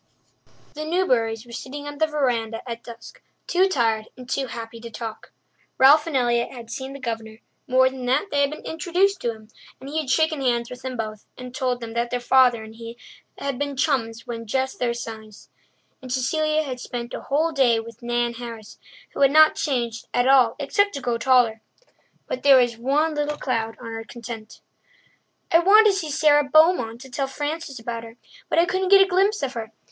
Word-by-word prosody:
The 305 - -5
Newburys 250 -10 0
were 240 - -14
sitting 280 +4 -7
on 290 0 -8
the 315 - +3
verandah 245 -7 -1
at 235 -1 -6
dusk, 235 - -12 0.2
too 370 +2 +3
tired 225 - 0
and 250 -1 -11
too 270 +1 -1
happy 230 -1 -8
to 235 0 -9
talk. 225 -1 -8 0.5
Ralph 295 +4 +6
and 300 -5 0
Elliott 240 -1 +1
had 235 -3 -10
seen 265 +2 -6
the 275 - -9
Governor; 225 -3 -5 0.3
more 260 0 +4
than 260 -1 -5
that, 290 +10 +1
they 285 - +2
had 280 - +3
been 305 - -9
introduced 360 +5 0
to 235 - 0
him, 220 -1 -14 0.3
and 270 - -10
he 315 - -1
had 300 -4 -4
shaken 315 +1 +2
hands 240 -2 0
with 250 0 -9
them 260 -1 -5
both 215 -2 -6
and 250 -1 -9
told 255 -2 -1
them 225 -1 -6
that 235 +1 -1
their 245 - -2
father 245 -2 +4
and 220 0 -12
he 230 0 -9 0.4
had 275 -2 -4
been 285 -1 -2
chums 230 -6 -1
when 230 -2 -6
just 265 +3 -2
their 240 -1 0
size. 220 -2 -9 0.5
And 255 -1 -9
Cecilia 310 +4 +1
had 255 -4 -5
spent 240 -1 -6
a - - -5
whole 310 +4 0
day 255 -6 +3
with 230 0 -10
Nan 240 0 -1
Harris, 230 -3 -9 0.3
who - - -7
had 275 - +7
not 310 +2 +6
changed 235 -6 -2
at 245 +1 +2
all 255 -4 +5
except 405 +9 +1
to 280 - -4
grow 240 -2 -1
taller. 240 -3 +3 0.6
But 255 - -4
there 275 -1 +7
was 240 -2 +2
one 285 +7 +1
little 295 0 -2
cloud 225 -5 -2
on 230 - -8
her 225 0 -5
content. 225 -2 -9 0.9
"I 330 - +6
wanted 420 +4 +6
to - - -2
see 325 -5 -3
Sara 295 0 +4
Beaumont 280 -6 +3
to 265 - -11
tell 270 +2 -2
Frances 290 +1 -4
about 230 0 -5
her, 225 +1 -12 0.3
but - - 0
I 335 - +5
couldn't 375 +1 -1
get 395 0 +8
a - - -2
glimpse 390 +1 +1
of 270 -1 -2
her. 225 -2 -6
255 Hz, 205 wpm, -23 LUFS, 230-295 Hz, 0.9 s, get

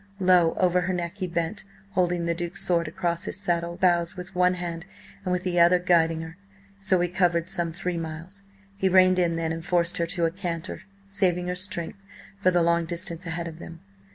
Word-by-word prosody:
Low 180 -3 +4
over 180 0 +2
her 185 +1 -1
neck 175 +2 -4
he 185 -2 -2
bent, 170 +3 -2 0.3
holding 175 -2 +1
the 170 - +1
Duke's 175 +1 -3
sword 170 -2 +2
across 170 +2 -2
his - - -5
saddle 170 -2 -1
bows 175 0 +2
with 180 +1 -7
one 180 0 +3
hand 170 0 -5 0.4
and 185 - -2
with 180 0 0
the 175 -1 0
other 175 +1 +6
guiding 165 -2 +2
her. 165 +1 -9 0.4
So 190 -2 +2
he 175 - +2
covered 175 -1 +1
some 175 -3 0
three 180 0 -3
miles. 165 +5 -6 0.3
He 190 -1 +1
reined 185 0 +5
in 170 -2 +2
then, 165 -1 -1
and 165 0 -4
forced 175 -1 +2
her 170 - 0
to 170 0 0
a 165 - +1
canter, 170 -2 -5 0.3
saving 180 -3 +1
her 180 - -1
strength 185 0 -2 0.4
for 185 - +4
the 175 -2 +3
long 170 0 +2
distance 170 +1 -3
ahead 165 +1 -3
of 165 0 -9
them. 170 0 -10
175 Hz, 210 wpm, -26 LUFS, 170-185 Hz, 0.4 s, other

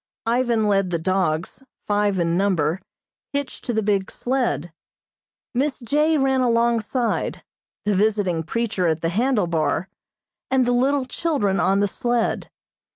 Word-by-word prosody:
Ivan 235 -2 +1
led 195 -2 +2
the 170 - 0
dogs, 170 +2 -1 0.2
five 205 -1 +1
in 170 -1 +1
number, 180 -3 +1 0.5
hitched 285 -1 -3
to - - -1
the 220 0 0
big 200 -2 +1
sled. 245 - -1 0.8
Miss 270 +3 0
J. 300 +6 +2
ran 265 -1 +2
alongside, 235 0 0 0.4
the 210 - +2
visiting 200 -4 +1
preacher 205 0 -1
at 160 0 0
the 165 - 0
handle 225 +2 +1
bar, 165 +1 -1 0.6
and 260 -1 +3
the 245 - +1
little 265 +2 +2
children 250 - 0
on 195 +2 +2
the 205 - +3
sled. 240 +3 -1
210 Hz, 140 wpm, -22 LUFS, 185-250 Hz, 0.8 s, and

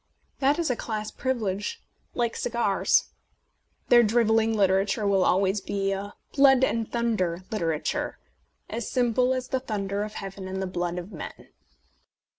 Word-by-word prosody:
That 280 +2 +3
is 335 -6 0
a - - 0
class 215 -2 -4
privilege, 230 - -2 0.4
like 235 -1 0
cigars. 235 -5 +1 0.8
Their 240 -1 +8
drivelling 225 0 +3
literature 195 +2 +2
will 195 -2 +3
always 195 +2 +2
be 195 0 -1
a 200 +1 -4 0.2
blood 270 -2 +6
and 230 -3 0
thunder" 190 -7 0
litera 165 -8 0
ture, - - -2 0.5
as 230 0 -4
simple 250 0 +2
as 255 -1 -2
the 260 - 0
thunder 200 -5 -3
of 210 0 -4
heaven 195 -1 -6
and 190 0 -4
the 190 - -1
blood 175 -1 -2
of 180 +3 -6
men. 165 - -9
215 Hz, 150 wpm, -26 LUFS, 195-240 Hz, 0.8 s, Their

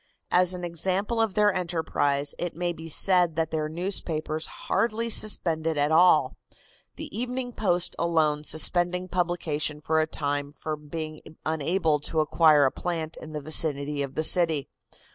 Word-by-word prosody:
As 180 0 +3
an 180 - -7
example 190 +6 -1
of 215 -4 -1
their 210 -1 +3
enterprise, 160 -5 -1
it 175 -1 -3
may 175 +1 -2
be 165 0 -10
said 180 0 +2
that 160 0 -1
their 155 -1 -2
newspapers 160 -3 -2
hardly 230 +3 -1
suspended 165 -7 +3
at 145 +1 +1
all, 175 +3 +4 0.6
the - - -8
Evening 245 +1 -3
Post 180 -4 -1
alone 155 -3 +1
suspending 175 +4 +2
publication 170 -4 -1
for 160 +1 0
a 155 - +1
time 145 -2 -3
from 150 0 -6
being 155 0 -6 0.3
unable 160 0 0
to 155 +2 -2
acquire 155 -1 +4
a 130 - +2
plant 165 -3 -4
in 155 - -10
the 150 - -4
vicinity 145 -1 +1
of 140 -1 -5
the 155 - -1
city. 160 -3 +2
160 Hz, 155 wpm, -26 LUFS, 155-180 Hz, 0.6 s, all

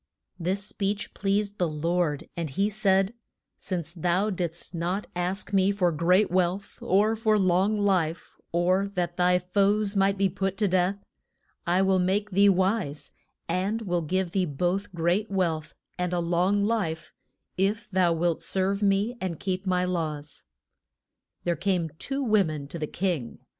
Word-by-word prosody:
This 190 +4 -1
speech 205 0 -2
pleased 205 +1 -1
the 175 -2 +1
Lord, 160 0 -1
and 170 -3 -3
he 195 +9 0
said, 195 -1 +2 0.5
Since 170 -3 -4
thou 180 +4 +1
didst 170 -2 -4
not 180 +4 -2
ask 180 +3 -2
me 195 0 +4
for 185 -4 +1
great 175 +5 +3
wealth, 185 +2 0
or 210 +4 +3
for 215 -1 +2
long 190 +2 +2
life, 180 -5 0 0.2
or 185 +3 +2
that 175 -1 -2
thy 180 0 +4
foes 200 +3 +1
might 195 0 +3
be 195 0 +3
put 195 +1 -2
to 210 - +2
death, 185 +1 +1 0.7
I 180 +2 +3
will 190 -1 +3
make 200 +3 0
thee 200 +2 +5
wise, 185 -5 0 0.4
and 195 +6 -1
will 175 -4 0
give 180 +2 -1
thee 190 -1 +1
both 180 +7 -1
great 175 +6 +1
wealth 170 -5 -1 0.2
and 180 0 -1
a 175 - +1
long 180 +4 +1
life 205 -8 -2 0.4
if 200 +5 0
thou 180 -2 +3
wilt 170 0 0
serve 195 +1 0
me 200 +4 +2
and 180 -4 -3
keep 190 0 -3
my 180 -1 +2
laws. 155 -5 -4 1.0
There 175 -1 0
came 180 -5 0
two 275 0 -3
wo 215 -4 +4
men 155 -4 -5
to 170 - -6
the 150 - -2
king. 170 -11 -2
185 Hz, 160 wpm, -27 LUFS, 175-200 Hz, 1.0 s, thee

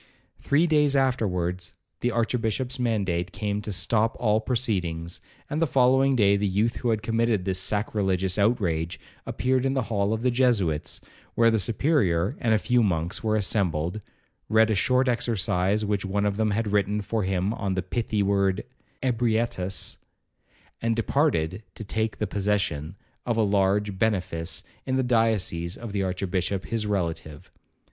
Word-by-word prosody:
Three 145 +4 +2
days 150 -3 +3
afterwards 95 -9 0 0.2
the 120 - 0
archbishop's 120 +2 -1
mandate 95 -7 0
came 105 0 -2
to 105 - -5
stop 110 +4 +1
all 110 -2 +2
proceedings; 90 -9 -2 0.3
and 150 +3 -2
the 165 - +3
following 130 +1 +4
day 100 -4 +4
the 100 0 0
youth 105 +5 0
who 120 - -1
had 110 -2 0
committed 115 -4 +1
this 95 -1 0
sacrilegious 95 -1 0
outrage 90 -7 0 0.3
appeared 130 0 0
in 135 0 0
the 130 - +1
hall 100 0 +1
of 110 +1 -2
the 125 - +3
Jesuits, 110 - +1 0.3
where 115 0 +5
the 110 - +2
Superior 100 - +1
and 115 - 0
a 110 - +5
few 125 +3 +2
monks 90 -1 -1
were 110 -1 +1
assembled, 90 -3 0 0.5
read 110 +1 +4
a - - +3
short 130 +5 +2
exercise 105 -4 0
which 100 -1 -1
one 100 +1 -1
of 100 -1 0
them 110 0 +1
had 105 0 -1
written 105 +1 +1
for 110 +2 -2
him 95 +1 0
on 100 -4 -2
the 95 - -1
pithy 110 -3 -1
word 100 -1 +1 0.4
'Ebrietas,' 115 -6 0 0.8
and 115 0 +1
departed 110 - +1
to - - -6
take 110 +1 -2
possession 95 -6 -1 0.3
of 120 -2 -1
a 110 - +3
large 100 0 +1
benefice 90 -6 -1 0.2
in 130 - -1
the 130 - +2
diocese 110 -8 +1
of 115 -3 -7
the 100 -1 -1
archbishop 95 0 -2
his 110 -2 -2
relative. 85 -6 -3
105 Hz, 155 wpm, -26 LUFS, 95-115 Hz, 0.8 s, where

